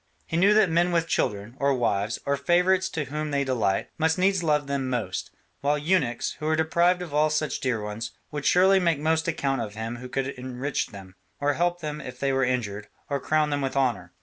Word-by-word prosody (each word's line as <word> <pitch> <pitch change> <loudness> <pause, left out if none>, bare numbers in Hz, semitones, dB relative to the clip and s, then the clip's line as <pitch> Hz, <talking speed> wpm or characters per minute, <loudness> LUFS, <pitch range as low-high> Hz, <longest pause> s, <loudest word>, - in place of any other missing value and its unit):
He - - -4
knew 200 +5 +5
that 205 -6 +4
men 175 +2 +3
with 165 -1 +1
children, 105 -5 -1
or 140 -1 +2
wives, 110 -3 0
or 140 - +1
favourites 180 +6 +2
in 150 - 0
whom 150 +2 -3
they 140 -1 +1
delight, 115 -7 0
must 160 +1 +2
needs 190 0 +2
love 150 -3 +1
them 140 -2 -2
most: 125 -3 -3 0.3
while 145 +1 +1
eunuchs, 150 -6 0
who 155 - -3
are 155 - +3
deprived 170 +3 +2
of 165 -5 -9
all 150 +1 +3
such 155 0 -1
dear 125 -4 0
ones, 105 +2 -5 0.2
would 150 -1 -4
surely 190 +2 +5
make 170 -4 +2
most 160 +2 0
account 135 -5 0
of 105 -2 -5
him 115 +2 -4
who 125 +1 -9
could 135 +1 -2
enrich 130 +1 -3
them, 95 -2 -12 0.3
or 145 0 +1
help 175 +2 0
them 150 -1 -4
if 125 0 -9
they 135 -1 +1
were 135 0 +2
injured, 110 -5 -2 0.2
or 140 - +1
crown 155 +1 +1
them 145 0 0
with 135 0 -2
honour. 115 -10 0
145 Hz, 220 wpm, -26 LUFS, 125-160 Hz, 0.3 s, knew